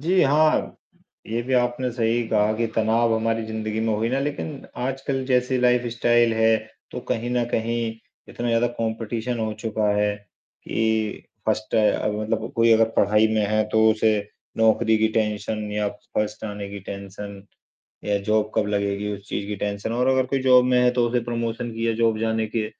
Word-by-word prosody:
जी, 180 +5 +3
हाँ 155 +3 +2 0.5
ये 115 +2 -2
भी 130 +2 -4
आपने 125 +1 +1
सही 115 0 +1
कहा 105 -1 +2
कि 115 +1 0
तनाव 115 +1 +2
हमारी 115 0 0
ज़िंदगी 110 0 -3
में 110 0 0
हुई 110 +2 0
ना। 130 - 0
लेकिन 145 0 -4 0.2
आजकल 135 +1 -2
जैसी 125 0 +1
लाइफस्टाइल 120 -1 +3
है 110 0 +4 0.3
तो - - -5
कहीं 115 +2 -1
न 125 -1 +1
कहीं 115 +1 -1 0.5
इतना 120 - -5
ज़्यादा 115 +1 +2
कॉम्पिटिशन 115 +1 -2
हो 110 -1 -1
चुका 110 -2 -1
है 105 0 +1 0.5
कि 110 -1 -1 0.2
1st 110 0 -1 0.4
मतलब 110 +2 -2
कोई 115 0 +5
अगर 115 0 +4
पढ़ाई 105 +2 +4
में 110 -1 +2
है। 110 +1 +2
तो 110 0 +4
उसे 110 -1 +2 0.4
नौकरी 110 0 +3
की 110 0 +3
टेंशन 105 -1 -1
या 105 0 0 0.3
1st 105 +1 -2
आने 105 -1 -5
की 100 0 -7
टेंशन 100 0 -8 0.6
या 105 -1 +1
जॉब 105 +1 +1
कब 110 -2 +1
लगेगी 100 0 -1
उस 100 0 -9
चीज़ 100 - -3
की 105 0 -4
टेंशन। 100 +2 -3
और 125 +2 +1
अगर 130 -1 +3
कोई 135 +1 0
जॉब 125 -1 +6
में 125 0 +3
है 125 0 +4
तो 125 -1 +1
उसे 120 +1 +1
प्रमोशन 115 0 -3
की 115 +1 -2
या - - +2
जॉब 115 -1 +2
जाने 110 0 0
के 110 -1 0
110 Hz, 180 wpm, -23 LUFS, 110-120 Hz, 0.6 s, जॉब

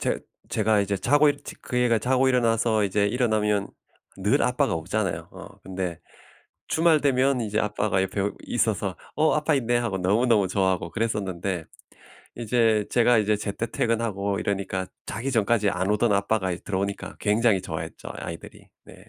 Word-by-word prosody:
제 - - 0 0.3
제가 110 -1 +2
이제 100 0 -1
자고 145 +8 +4
일 145 0 0
저 - - -8
그 125 - -4
애가 120 -2 +3
자고 130 +3 +2
일어나서 115 -3 +2
이제 100 +1 +1
일어나면 105 -3 +1 0.5
늘 - - +2
아빠가 - - +1
없잖아요. 85 -1 -2
어 - - -10
근데 90 -3 -4 0.7
주말 160 -1 +3
되면 135 -1 +2
이제 105 -1 -1
아빠가 105 -2 0
옆에 100 +1 -1
있어서 105 -5 -1 0.2
"어 155 - +3
아빠 150 0 +2
있네." 120 -2 +1
하고 115 -5 -1
너무너무 105 +2 +2
좋아하고 95 -1 0
그랬었는데 95 -6 -2 0.7
이제 115 -2 +2
제가 120 -1 +4
이제 105 0 +2
제때 105 +2 -3
퇴근하고 105 -4 -1
이러니까 95 -2 -2 0.2
자기 115 +7 -4
전까지 110 -2 +2
안 95 +1 -1
오던 105 0 +2
아빠가 100 -1 +1
이제 85 - -8
들어오니까 100 0 -3
굉장히 105 -2 +2
좋아했죠 80 -3 -6
아이들이. 85 - -9 0.2
네. - - -13
105 Hz, 360 characters per minute, -25 LUFS, 100-120 Hz, 0.7 s, 자고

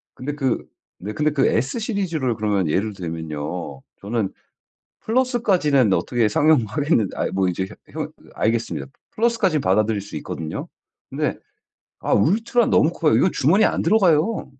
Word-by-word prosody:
근데 145 +3 -5
그 135 -4 -1 0.3
네. 105 +3 -6
근데 150 +3 0
그 140 -2 +2
S 135 - 0
시리즈를 170 - -1
그러면 100 -5 0
예를 105 +7 0
들면요. 80 -4 -5 0.2
저는 105 -1 -2 0.7
플러스까지는 205 - +2
어떻게 120 0 +1
상용하겠는데 140 - +2
아이 - - -1
뭐 95 -1 +1
이제 95 +2 -2 0.2
혀 - - -6
현 - - -7 0.2
알겠습니다. 115 +1 -1 0.3
플러스까지는 220 -8 +1
받아들일 105 +1 +1
수 100 -5 -9
있거든요. 80 +1 -5 0.4
근데 - - -2 0.6
아 - - -2
울트라는 225 - +2
너무 160 +3 +4
커요. 155 -3 +2
이거 185 - +3
주머니에 180 +11 +3
안 - - -1
들어가요. 190 -1 +3
130 Hz, 355 characters per minute, -22 LUFS, -, 0.7 s, 너무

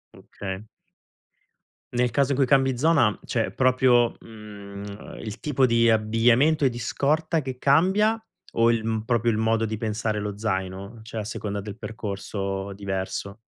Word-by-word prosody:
Okay. 95 0 -7 1.3
Nel 125 0 +2
caso 140 +3 +1
in 135 - 0
cui 135 -2 +3
cambi 135 -1 +3
zona, 140 -5 +3
cioè - - -1
proprio, 125 -2 +3
mhmm, 100 -2 -10
il 110 -2 -6
tipo 135 -3 +2
di 115 -1 +4
abbigliamento 115 +7 +3
e - - +5
di 120 -1 -7
scorta 155 +6 0
che 130 -2 -6
cambia 190 - +3 0.3
o 115 0 +4
il 115 -2 0
mhmm, 110 -1 -1
proprio 120 +1 +1
il 110 - +1
modo 110 0 +1
di 110 0 -3
pensare 110 0 -2
lo 105 -1 -4
zaino? 100 +1 -4
Cioè 110 0 -5
a - - -5
seconda 100 -1 -4
del 105 0 -8
percorso 100 -3 -4
diverso? 100 +1 -4
115 Hz, 155 wpm, -25 LUFS, 105-130 Hz, 1.3 s, e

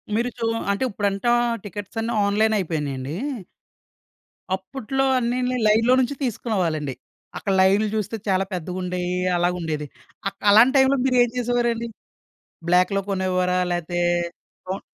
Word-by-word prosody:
మీరు 235 +3 +1
చూ 230 - -1 0.3
అంటే 200 +6 -1
ఇప్పుడంటా 200 +2 0 0.3
టికెట్స్ 205 +2 -8
అన్నీ 230 +1 -2
ఆన్లైన్ 215 +2 +2
అయిపోయినాయండి. 150 -5 -3 1.4
అప్పట్లో 265 +7 -3 0.2
అన్నిని 250 +1 0
లైన్‌లో 225 +4 +4
నుంచి 260 +2 0
తీసుకునేవాళ్ళండి. 180 - -1 0.4
అక్కడ 195 - -1
లైన్‌లు 200 +3 +4
చూస్తే 215 +1 -2
చాలా 190 0 +2
పెద్దగా 180 0 -4
ఉండేవి. 180 0 -2 0.2
అలాగా 175 +1 +1
ఉండేది. 155 -2 -3 0.4
ఆక్ 195 0 -6
అలాంటి 230 +6 +7
టైంలో 265 +1 +4
మీరు 255 -1 +2
ఏం 240 - 0
చేసేవారండి? 240 -1 0 0.8
బ్లాక్‌లో 185 +3 +3
కొనేవారా? 185 -1 +1
లేతే 175 0 -2 0.7
కౌం 190 +1 -3
200 Hz, 125 wpm, -23 LUFS, 180-235 Hz, 1.4 s, అలాంటి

